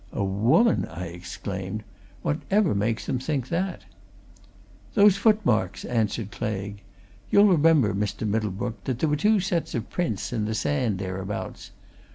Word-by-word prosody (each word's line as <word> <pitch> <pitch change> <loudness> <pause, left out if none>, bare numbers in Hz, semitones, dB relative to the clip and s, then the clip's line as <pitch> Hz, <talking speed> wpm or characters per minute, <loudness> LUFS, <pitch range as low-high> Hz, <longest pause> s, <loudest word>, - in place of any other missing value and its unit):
"A 100 - -1
woman!" 115 - +3
I 85 +2 -6
exclaimed. 95 +3 -6 0.4
"Whatever 190 +5 +1
makes 110 +3 -1
them 130 - -1
think 135 -2 -2
that?" 175 - -2 1.1
"Those 205 -1 +6
footmarks," 125 - +2
answered 110 -3 -1
Claigue. 100 -2 -4 0.5
"You'll 205 +1 +6
remember, 160 - +4
Mr. 105 +2 -2
Middlebrook, 110 +1 -2
that 130 -3 -1
there 155 +4 +1
were 150 - +2
two 210 +7 +3
sets 180 -5 -1
of 115 -1 -4
prints 160 - -2
in 110 -3 -1
the 110 +1 -2
sand 125 -4 0
thereabouts. 95 +1 -5
115 Hz, 140 wpm, -25 LUFS, 100-160 Hz, 1.1 s, Those